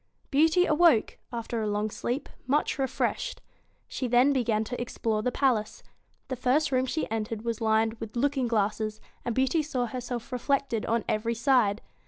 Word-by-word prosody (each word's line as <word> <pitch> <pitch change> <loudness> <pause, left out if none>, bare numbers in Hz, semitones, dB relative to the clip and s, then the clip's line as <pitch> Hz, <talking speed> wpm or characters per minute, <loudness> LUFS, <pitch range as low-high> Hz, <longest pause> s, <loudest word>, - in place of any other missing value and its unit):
Beauty 320 +5 +4
awoke, 310 -7 +3
after 230 -1 -3
a 215 - -1
long 210 +1 -1
sleep, 250 +7 -3 0.2
much 285 0 +1
refreshed. 265 -1 -1 0.5
She 255 - -3
then 250 +4 +4
began 230 -5 +1
to 245 +2 -5
explore 225 -2 -1
the 250 - 0
palace. 240 -6 0 0.4
The 260 - -3
first 265 +5 +1
room 260 0 +2
she 315 +5 -1
entered 220 0 -3
was 230 -1 -3
lined 220 0 +2
with 225 0 -7
looking 270 0 +1
glasses, 215 -1 0 0.2
and 235 - -2
Beauty 265 +5 +2
saw 275 -5 -2
herself 245 0 -5
reflected 250 -2 0
on 230 0 0
every 230 +2 0
side. 230 -3 +3
240 Hz, 165 wpm, -28 LUFS, 220-265 Hz, 0.5 s, Beauty